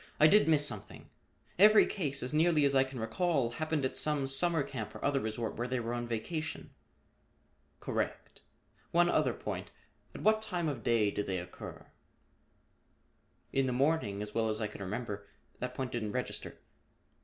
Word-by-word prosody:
I 155 - +7
did 205 +5 +6
miss 150 -2 +5
something. 105 -6 -4 0.5
Every 215 +2 +8
case, 140 -9 -2
as 125 - -2
nearly 155 -1 +4
as 140 - +2
I 135 -1 +5
can 130 -1 -7
recall, 130 +2 0
happened 155 +2 -1
at 130 - -2
some 150 -3 +1
summer 160 +4 +3
camp 115 -7 -6
or - - -5
other 140 -1 +2
resort 110 -1 -3
where 120 +2 -2
they 130 0 -1
were 115 0 -3
on 120 0 -3
vacation." 155 +8 -4 1.1
"Correct. - - -4 0.5
One 175 +1 +4
other - - +2
point. - - -5 0.5
At - - -7
what 215 0 +4
time 180 -6 -2
of 140 -6 -3
day 110 -3 +3
did 105 - -3
they 95 -1 -1
occur?" 90 0 -8 1.7
"In 135 -1 +2
the 125 - 0
morning, 125 -7 +1
as 105 0 -8
well 115 -1 +1
as 110 0 -1
I 110 - -1
can 105 -1 -7
remember. 100 0 -4 0.3
That 125 0 -4
point 130 -1 -3
didn't 110 -4 -3
register." - - -4
130 Hz, 175 wpm, -32 LUFS, 110-155 Hz, 1.7 s, Every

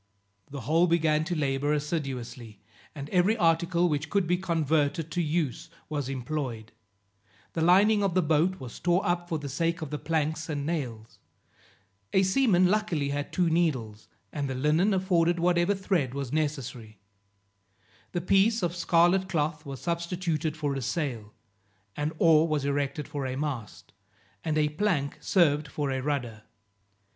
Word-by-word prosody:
The 140 -1 -6
whole 165 +8 +3
began 160 -2 +2
to 175 +1 -2
labor 140 -1 0
assiduously, 130 - -4 0.4
and 140 -1 -6
every 190 +5 +3
article 170 0 +2
which 150 -1 -2
could 200 0 +1
be 175 +2 +2
converted 160 -2 0
to 175 - 0
use 160 0 -2 0.2
was 145 -4 -3
employed; 125 -4 -4 0.8
the 165 - -2
lining 200 +5 +5
of 195 -3 0
the 185 - +3
boat 165 +4 +1
was 125 -3 -9
tore 175 +2 +1
up 175 0 -1
for 165 - 0
the 145 -2 -6
sake 165 +5 -1
of 150 - -7
the 150 - -3
planks 155 0 -1
and 145 -2 -2
nails; 125 -9 -4 0.9
a 190 - +4
seaman 190 -2 +3
luckily 180 -7 +1
had 145 0 -3
two 180 -2 +1
needles, 130 -11 -1 0.3
and 140 -2 -2
the 130 - -3
linen 155 +9 +2
afforded 175 -2 +2
whatever 175 +3 +2
thread 175 -9 -1
was 140 -2 -4
necessary; 135 -8 -3 1.1
the 175 - -2
piece 195 +4 +3
of 175 0 -1
scarlet 175 +2 +3
cloth 150 -3 -1
was 135 -2 -7
substituted 170 -2 -2
for 145 -3 -1
a 135 - -3
sail; 125 - -3 0.6
an 150 +1 -1
oar 160 -1 +5
was 150 -3 -1
erected 140 +1 -1
for 145 -3 -4
a 130 - -3
mast, 135 -7 -5 0.5
and 155 -1 -1
a 150 -1 +2
plank 150 -4 -1
served 150 -5 +2
for 145 -1 -3
a 130 0 -2
rudder. 130 -6 -3
155 Hz, 155 wpm, -28 LUFS, 140-175 Hz, 1.1 s, lining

